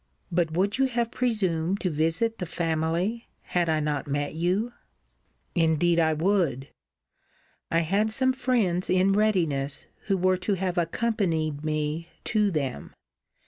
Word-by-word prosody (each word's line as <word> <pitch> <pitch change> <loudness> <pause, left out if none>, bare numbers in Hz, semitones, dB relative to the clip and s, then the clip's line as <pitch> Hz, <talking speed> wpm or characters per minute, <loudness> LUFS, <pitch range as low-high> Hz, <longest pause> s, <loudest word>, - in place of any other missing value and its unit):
But 170 -2 +1
would 200 +7 0
you 270 - +5
have 235 -2 -1
presumed 195 -7 0
to 180 - 0
visit 165 +10 0
the 180 - -3
family, 170 +8 -1
had 175 -2 -1
I 155 -1 +2
not 150 -2 -2
met 145 0 -2
you? 185 +9 0 0.8
Indeed 170 0 +2
I 160 -1 +3
would. 155 -6 0 1.0
I 165 - +2
had 200 +7 +1
some 260 +4 +2
friends 235 -9 0
in 185 +1 +3
readiness, 165 -10 +1 0.2
who 195 -2 +2
were 185 0 +2
to 190 +2 -1
have 185 -1 -1
accompanied 165 -6 -1
me 155 +1 -2 0.2
to 210 -2 +2
them. 140 - -3
175 Hz, 140 wpm, -26 LUFS, 160-205 Hz, 1.0 s, you